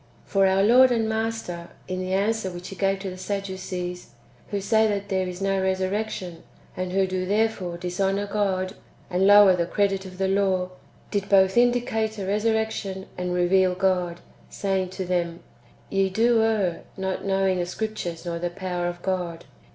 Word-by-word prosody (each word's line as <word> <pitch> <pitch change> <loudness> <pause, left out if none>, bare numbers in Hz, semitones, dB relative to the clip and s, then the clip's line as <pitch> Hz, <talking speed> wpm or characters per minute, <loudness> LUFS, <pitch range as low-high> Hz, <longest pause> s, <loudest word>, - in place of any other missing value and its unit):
* - - -30
2. - - -27
For 195 -1 +4
our 190 +1 +3
Lord 250 +5 +7
and 225 -2 +1
Master, 220 -6 -3 0.2
in 185 0 -3
the 185 0 -3
answer 205 +1 +1
which 175 0 -8
He 195 - -8
gave 195 0 +1
to 195 -1 -4
the 185 - -9
Sadducees, 185 -2 -4 0.4
who 205 - -1
say 220 +3 +3
that 200 -1 -2
there 190 -1 0
is 180 +1 -5
no 195 -1 +1
resurrection, 190 -2 -2 0.3
and 185 0 -3
who 190 +1 +2
do 185 0 -2
therefore 205 -4 0
dishonour 195 +3 -1
God, 195 -2 -1 0.4
and 185 +2 +3
lower 205 -2 +8
the 170 -1 -1
credit 195 -1 +1
of 185 0 -11
the 190 0 +1
law, 190 -2 +1 0.4
did 200 -1 -1
both 190 -1 +5
indicate 240 -3 +2
a 195 - -4
resurrection, 210 -2 -1
and 180 0 -2
reveal 180 +1 +3
God, 180 -2 0 0.3
saying 190 -2 -1
to 190 0 -5
them, 175 -1 -1 0.2
" - - -29
Ye 195 -1 +2
do 225 +4 +3
err, 210 -6 +1 0.2
not 190 -1 -3
knowing 195 -1 +1
the 175 - -1
Scriptures, 180 -4 -4
nor 170 -1 -3
the 175 +1 -1
power 180 -1 -3
of 175 0 -6
God." 175 -3 -2
190 Hz, 180 wpm, -25 LUFS, 180-205 Hz, 0.4 s, lower